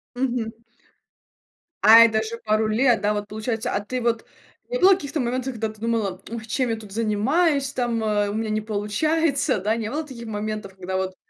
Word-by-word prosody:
Мгм. 245 -3 -1 1.3
А, 225 +1 +9
это 220 -1 +5
же 225 +1 -5
пару 215 0 +2
лет, 230 +1 +3
да, 210 0 +1
вот. 205 0 -3
Получается, 220 +1 -3
а - - +1
ты 255 +4 -4
вот 230 -1 0 0.4
не - - -2
было 380 +2 +7
каких-то 295 -3 -4
моментов, 255 +1 -2
когда 220 -1 -2
ты 215 0 -14
думала: 220 -5 -1
"Ой, 230 -1 -6
чем 250 +3 -1
я 225 - 0
тут 215 -2 -12
занимаюсь, 270 - +1
там, 240 -3 -1
у 205 -2 0
меня 220 0 -2
не 215 0 0
получается", 265 +7 0
да? 210 +4 0
Не 225 -2 -3
было 300 +6 -2
таких 235 -5 -9
моментов, 210 -2 -4
когда 185 0 -5
вот 190 0 -3
225 Hz, 190 wpm, -23 LUFS, 210-250 Hz, 1.3 s, А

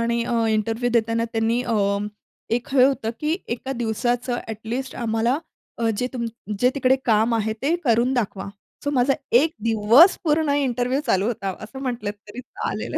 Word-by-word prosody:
आणि 235 0 0
अ, 230 -1 0
इंटरव्ह्यू 225 +3 0
देताना 230 0 +1
त्यांनी 225 +2 +1
अ, 235 -2 -1 0.8
एक 240 - -3
हे 255 -1 +7
होतं 260 -5 +1
की 310 +3 0 0.2
एका 265 +3 -4
दिवसाचं 240 +2 -1
ॲटलीस्ट 225 +4 -5
आम्हाला 230 +3 0 0.4
अ, 230 -1 +1
जे 250 - 0
तुम्ह 230 -3 -5
जे 250 +3 +4
तिकडे 265 -1 +3
काम 225 0 +3
आहे 220 -1 0
ते 310 +5 +2
करून 240 +2 +3
दाखवा. 200 -5 -2 0.4
सो 285 - 0
माझा 270 0 +3 0.2
एक 315 +5 +4
दिवस 230 - +6
पूर्ण 310 -1 +2
इंटरव्ह्यू 255 -1 0
चालू 195 +2 +2
होता, 195 -5 -2
असं 220 +5 -9
म्हटलं 240 -6 -2
तरी 210 +3 -10
चालेल. 250 - -5
235 Hz, 165 wpm, -23 LUFS, 225-255 Hz, 0.8 s, हे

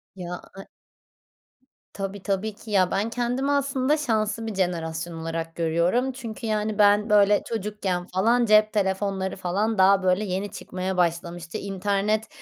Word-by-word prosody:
Ya, 180 -1 -6 0.2
e 195 - -8 1.3
Tabii, 195 0 -5
tabii 200 +2 -1
ki, 215 +1 -12
ya, 185 -3 +3
ben 205 +4 0
kendimi, 245 +4 -1
aslında, 280 +1 +1
şanslı 225 -5 -1
bir 220 - -4
jenerasyon 170 -2 -2
olarak 165 0 -4
görüyorum 170 +10 +1
çünkü, 230 -3 -7
yani, 215 -1 -1
ben, 210 +1 +4
böyle, 205 0 +5
çocukken, 200 -5 -3
falan, 230 +6 +2
cep 215 0 +5
telefonları, 190 -1 -1
falan, 200 +5 -1
daha, 190 0 +5
böyle, 185 +3 +2
yeni 195 +1 -3
çıkmaya 185 -2 -4
başlamıştı, 170 0 -1
internet 200 +2 -1
200 Hz, 140 wpm, -25 LUFS, 185-220 Hz, 1.3 s, böyle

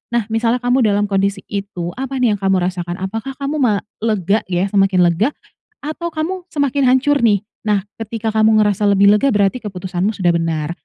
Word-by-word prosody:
Nah, 235 - +2
misalnya 230 +2 0
kamu 245 +2 +2
dalam 205 0 +2
kondisi 195 0 0
itu, 195 -4 -4
apa 270 0 -4
nih 250 -4 +2
yang - - -10
kamu 195 -2 +1
rasakan? 175 -1 -3
Apakah 225 +7 -4
kamu 285 +2 -3
ma 215 -7 +1 0.2
lega 210 -2 +1
ya, 180 -1 0
semakin 195 -2 +3
lega 175 +8 +2 0.5
atau 310 +3 -4
kamu 355 +4 -4
semakin 285 -4 0
hancur 290 +2 +2
nih? 210 -5 +2 0.2
Nah, 205 -2 +2 0.2
ketika 225 0 -3
kamu 220 0 +3
ngerasa 205 0 +1
lebih 200 0 +5
lega, 210 +6 +3
berarti 205 +4 +2
keputusanmu 190 -1 -3
sudah 180 -3 +2
benar. 165 -2 -1
210 Hz, 185 wpm, -18 LUFS, 190-245 Hz, 0.5 s, lebih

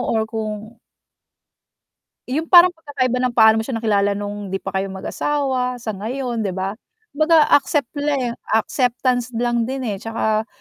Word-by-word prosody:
or 220 - +2
kung 220 0 -6 1.5
yung 315 +5 -1
parang 355 0 +8
pagkakaiba 285 -7 -2
ng 250 -1 -1
paano 220 -1 +6
mo - - 0
siya 260 - -4
nakilala 205 -2 +1
nung 205 0 -5
hindi 195 0 -3
pa 195 - -4
kayo 195 - -2
mag-asawa 260 +4 -2
sa 220 - -3
ngayon 235 +3 -3
'di 185 - -3
ba? 190 +2 -3 0.4
Kumbaga 310 +1 +3
accept 285 -2 +2
le 280 -4 0 0.2
acceptance 245 +1 0
lang 235 0 0
din, 265 +1 -4
eh, 210 -5 -3
'tsaka 220 0 -1
240 Hz, 155 wpm, -20 LUFS, 215-270 Hz, 1.5 s, parang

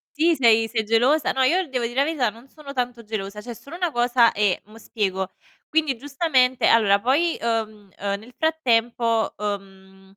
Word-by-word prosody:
Sì? 325 +2 +3
Sei 225 -4 +4
sei 225 -1 -1
gelosa? 245 +8 +2
No 265 - -1
io 345 +7 +2
devo 250 -3 -2
dire 240 +1 -5
la 275 - +3
verità, 285 -6 0
non 230 +5 -15
sono 290 0 -11
tanto 245 -3 -3
gelosa, 210 -1 -5
c'è 240 +2 -7
solo 280 +8 -11
una 355 -2 0
cosa, 240 -2 +3
e 205 -3 0
mo' 215 +2 -16
spiego. 190 -4 -3 0.4
Quindi 305 -5 0
giustamente 265 -2 +1
allora 205 -3 +4
poi, 295 +8 +2
uhm, 220 -3 -3
uhm, 200 0 -2
nel 230 +4 -15
frattempo, 235 -7 +1
uhm, 195 -2 -7
235 Hz, 175 wpm, -23 LUFS, 210-275 Hz, 0.4 s, Sei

